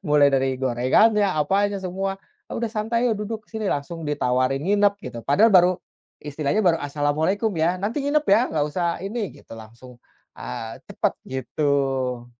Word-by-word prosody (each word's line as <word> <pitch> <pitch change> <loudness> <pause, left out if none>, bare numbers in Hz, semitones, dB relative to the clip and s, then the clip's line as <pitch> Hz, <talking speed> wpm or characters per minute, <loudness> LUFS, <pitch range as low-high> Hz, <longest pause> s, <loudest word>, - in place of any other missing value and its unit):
mulai 145 -1 +5
dari 135 -1 +1
gorengannya, 160 - +3
apa 180 +7 +1
aja 205 -1 -2
semua, 195 +1 -3 0.3
"Udah 235 0 -2
santai, 230 +2 0
ayo 225 - 0
duduk 210 +1 -6
sini," 220 -1 -5
langsung 160 +3 -5
ditawarin 130 -2 0
nginep 200 +4 +2
gitu, 120 - -7
padahal 200 +11 +4
baru 180 -4 +6 0.5
istilahnya 150 +6 -1
baru, 175 -5 +3
"Assalamualaikum, 155 +8 0
ya 175 +3 +1
nanti 225 +8 -2
nginep 295 +1 +1
ya 205 +4 +6
nggak 150 -2 +1
usah 170 +2 -2
ini," 215 -2 -3
gitu - - -12
langsung, 115 +3 -13 0.4
eee, 110 - -7
cepet - - 0 0.2
gitu. 130 -2 -1
165 Hz, 155 wpm, -23 LUFS, 135-205 Hz, 0.5 s, baru